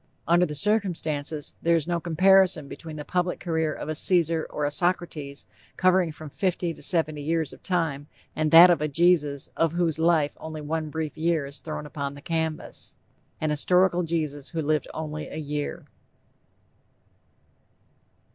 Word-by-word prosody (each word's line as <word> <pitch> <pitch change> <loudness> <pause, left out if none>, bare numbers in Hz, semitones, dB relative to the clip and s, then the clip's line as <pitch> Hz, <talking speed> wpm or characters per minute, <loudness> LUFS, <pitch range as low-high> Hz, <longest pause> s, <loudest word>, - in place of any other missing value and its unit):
Under 175 +1 +4
the 150 - -6
circumstances, 160 -7 -1
there 170 0 +3
is 160 -3 0
no 170 0 -1
comparison 180 -1 +3
between 160 +2 -9
the 150 -1 -7
public 180 0 -1
career 160 -3 -1
of - - -6
a 155 - -2
Caesar 165 0 +2
or 150 - -2
a 145 - -1
Socrates 160 -5 -2 0.3
covering 185 -2 +3
from 155 0 -10
fifty 180 -1 -1
to - - -15
seventy 155 -4 +2
years 160 0 -1
of - - -15
time, 160 -6 -1 0.3
and 155 0 0
that 170 +3 +9
of 170 - +1
a 150 - +1
Jesus 150 -2 +2
of 165 -1 +1
whose 170 -2 0
life 160 -3 +2
only 160 0 -7
one 155 +1 -3
brief 155 0 -5
year 165 -2 +1
is 140 +1 -6
thrown 155 -1 -6
upon 140 -1 -5
the 140 - -11
canvas. 160 0 -3 0.4
An 155 -1 -1
historical 180 +4 +3
Jesus 155 -4 -3
who 165 -2 -3
lived 155 +1 0
only 155 -1 -5
a - - -8
year! 150 -1 -4
160 Hz, 165 wpm, -25 LUFS, 150-175 Hz, 0.4 s, that